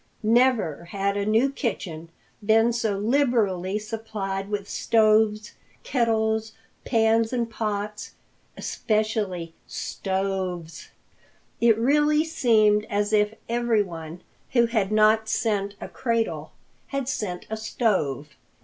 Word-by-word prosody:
Never 225 - +2
had 200 +2 -2
a 205 0 -1
new 225 +6 +3
kitchen 170 - -4 0.3
been 225 +2 +4
so 220 -4 -1
liberally 210 -5 +1
supplied 210 -3 -4
with 205 -1 -3
stoves, 215 -1 +2 0.3
kettles, 220 -3 0 0.3
pans 225 -1 +2
and 240 -2 -1
pots, 210 -2 -4 0.4
especially 210 -6 -2
stoves. 190 -3 -3 0.7
It 230 -2 +4
really 295 +5 +3
seemed 215 -9 +3
as 205 +1 0
if 210 0 +2
everyone 200 -9 -1 0.3
who 235 -2 +5
had 220 -4 0
not 215 +1 +4
sent 205 -3 -1
a - - -6
cradle 230 -2 -2 0.4
had 275 -2 -3
sent 185 -9 -3
a - - 0
stove. 190 - -1
215 Hz, 105 wpm, -25 LUFS, 200-230 Hz, 0.7 s, who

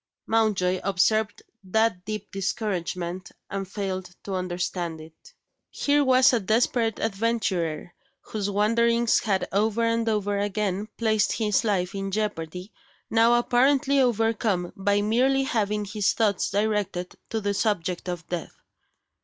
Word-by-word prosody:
Mountjoy 200 -5 +1
observed 210 +3 +1 0.2
that 195 -1 +1
deep 215 0 -5
discouragement, 185 -3 -3 0.2
and 195 -1 -3
failed 190 -2 -4
to 195 - -5
understand 175 -2 -3
it. 155 0 -15 0.3
Here 290 0 +2
was 260 0 +5
a 240 - +3
desperate 225 +2 +1
adventurer, 195 -7 -1 0.3
whose 205 -2 -4
wanderings 230 +3 +3
had 195 -3 0
over 215 +3 +1
and 230 0 +1
over 205 -2 0
again 205 0 -1
placed 220 -2 +2
his 215 -1 +1
life 190 -5 0
in 195 0 -3
jeopardy, 190 -2 -4 0.4
now 230 +1 +5
apparently 270 +3 +3
overcome 225 -6 +1
by 200 +1 +1
merely 260 +5 +2
having 210 -4 -1
his 205 0 0
thoughts 210 -4 +1
directed 205 -3 -1
to 225 - -1
the 205 -1 -1
subject 185 -4 -1
of 175 -2 -5
death! 175 -2 -5
205 Hz, 130 wpm, -25 LUFS, 185-225 Hz, 0.4 s, was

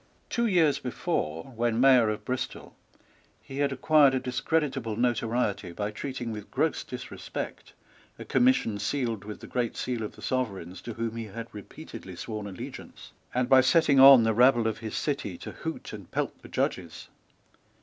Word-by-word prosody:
Two 235 -1 +1
years 160 -8 +3
before, 80 - -3
when 115 0 0
Mayor 130 -4 +6
of 105 0 -4
Bristol, 130 +1 -4 0.6
he 135 +1 -8
had 140 -1 +2
acquired 140 0 +4
a - - +1
discreditable 130 -2 -1
notoriety 115 -5 0
by 105 +3 -3
treating 125 +1 -5
with 105 -2 -7
gross - - 0
disrespect - - -7 0.4
a - - -8
commission 245 - +2
sealed 115 -1 -2
with 105 0 -8
the - - -8
great 120 -2 -2
seal 125 -2 -2
of 105 - -5
the - - -14
Sovereigns 95 -8 -3
to 115 +4 -6
whom 115 0 -3
he 115 - -4
had 115 +3 -8
repeatedly 95 -2 -10
sworn 105 +3 -5
allegiance, 95 -2 -9 0.2
and 125 0 0
by 130 0 +7
setting 140 +1 +4
on 135 -3 +10
the 110 0 +2
rabble 120 0 +5
of 110 -1 -1
his 110 -1 -5
city 135 - -2
to - - -8
hoot - - -6
and - - -9
pelt - - -3
the - - -13
Judges. - - -3
120 Hz, 170 wpm, -28 LUFS, 105-135 Hz, 0.6 s, on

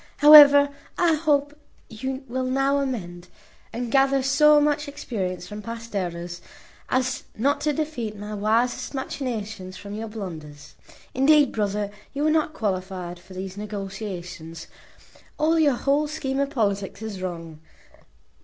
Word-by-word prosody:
However, 290 -1 +9 0.3
I 345 -2 +3
hope 290 -2 +1 0.3
you 260 +4 -5
will 255 +2 -2
now 270 +2 +1
amend, 180 -10 -4 0.4
and 235 0 -4
gather 270 0 +3
so 295 +3 +5
much 295 0 +1
experience 190 -11 -4
from 210 +2 -7
past 230 0 -8
errors, 175 -2 -4 0.5
as 255 0 -1
not 280 +6 +1
to 300 - +1
defeat 260 -9 -3
my 210 +1 -7
wisest 225 +6 0
machinations 220 -8 -5
by 200 - -8
your 220 +2 -5
blunders. 160 -9 -8 0.4
Indeed, 285 +1 +4
brother, 205 -1 -2 0.2
you 290 +2 0
are 310 - +3
not 310 -1 +1
qualified 185 - -3
for 185 +1 -14
these 190 +1 -6
negociations. 195 -5 -6 0.7
All 320 +2 +2
your 290 -4 +4
whole 285 +4 +1
scheme 270 -3 -3
of 280 0 0
politics 200 -4 -2
is 205 -4 -6
wrong. 165 -4 -6
225 Hz, 135 wpm, -24 LUFS, 195-280 Hz, 0.7 s, However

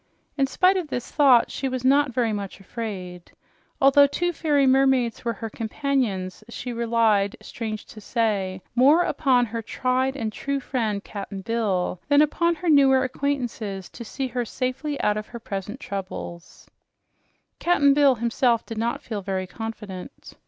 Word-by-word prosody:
In 275 -1 +2
spite 370 +7 +3
of 355 -4 -2
this 250 -4 -5
thought, 270 -5 +5
she 270 - -2
was 255 -1 -4
not 280 +1 +4
very 230 -2 0
much 200 -2 -5
afraid. 190 -4 -7 0.5
Although 275 +1 +6
two 350 +5 -1
fairy 290 -4 +2
mermaids 265 -3 +3
were 235 -1 -1
her 225 - -6
companions, 220 -6 -2
she 245 +1 -5
relied, 225 -4 +2
strange 215 -2 -6
to 215 - -12
say, 200 -5 -1
more 280 +8 +5
upon 255 -7 +2
her 230 0 -4
tried 255 +4 -1
and 220 -3 -3
true 280 0 -2
friend, 225 -6 -2
Cap'n 200 -1 -7
Bill, 195 -5 -1
than 290 0 +5
upon 335 +3 +1
her 345 +3 -6
newer 270 -4 +5
acquaintances 245 -8 -3
to 240 - -8
see 260 +3 -4
her 245 0 -2
safely 265 +5 -3
out 210 0 +1
of 215 - -5
her 235 - -8
present 210 0 -6
trouble. 190 -6 -6 1.2
Cap'n 290 -5 +4
Bill 280 -2 +5
himself 235 0 +1
did 225 -1 -6
not 235 +1 -2
feel 215 -3 -4
very 190 -1 -2
confident. 210 -2 -8
235 Hz, 160 wpm, -24 LUFS, 210-275 Hz, 1.2 s, Although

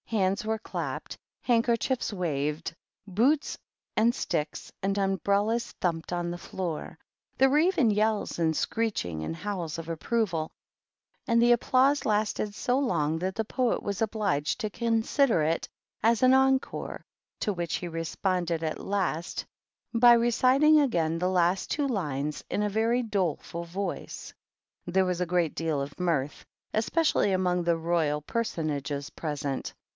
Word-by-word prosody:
Hands 200 0 +1
were 220 0 -1
clapped, - - -5 0.3
handkerchic 240 +1 +2
waved, 155 -4 -2 0.3
boots, 250 +11 +2 0.4
and 230 +2 +4
sticks, 155 -9 -3
and 195 +1 0
umbrellas 200 +4 +1
thump 165 -2 -2
on 175 -1 -1
the 175 - -4
floor. 175 -4 -5 0.4
There 270 - +5
were 290 +3 +4
even 325 - +3
yells, 215 0 0
and 160 -2 +2
screecb 155 - -1
and 80 +1 -3
howls 175 - -4
of 165 -1 -6
approval, 165 0 -1 0.8
and 230 -2 +3
the 240 0 +6
applause 260 +4 +3
lasted 210 -1 0
long 170 - +1
that 185 +2 -2
the 220 - -1
Poet 250 +2 0
was 200 0 -3
obliged 205 -9 0
to 215 - -1
consider 230 - +2
it 160 +2 0 0.3
as 230 0 +3
encore^ 265 +1 +2 0.4
to 210 - 0
which 175 -3 -2
he 175 - -4
responded 170 0 -1
at 155 -1 -3
last 185 -4 -2 0.5
by 240 0 +7
reciti 260 +6 +4
again 165 - 0
the 180 +1 +1
last 180 0 +1
two 290 -1 +1
lines 150 - -2
in 210 - 0
a 210 - +1
very 225 +4 +1
doleful 180 -5 -2
voi 185 +4 -4 0.8
There 190 +2 +2
was 180 -1 -1
a 180 - 0
great 175 -3 +1
deal 160 -3 -1
of 140 +1 -5
mirth, 155 -6 -1 0.3
especially 225 - +2
amo 180 -1 +1
the 170 -1 +1
Royal 160 -3 0
Personages 150 - -3
present. 145 -3 -4
190 Hz, 140 wpm, -28 LUFS, 165-230 Hz, 0.8 s, by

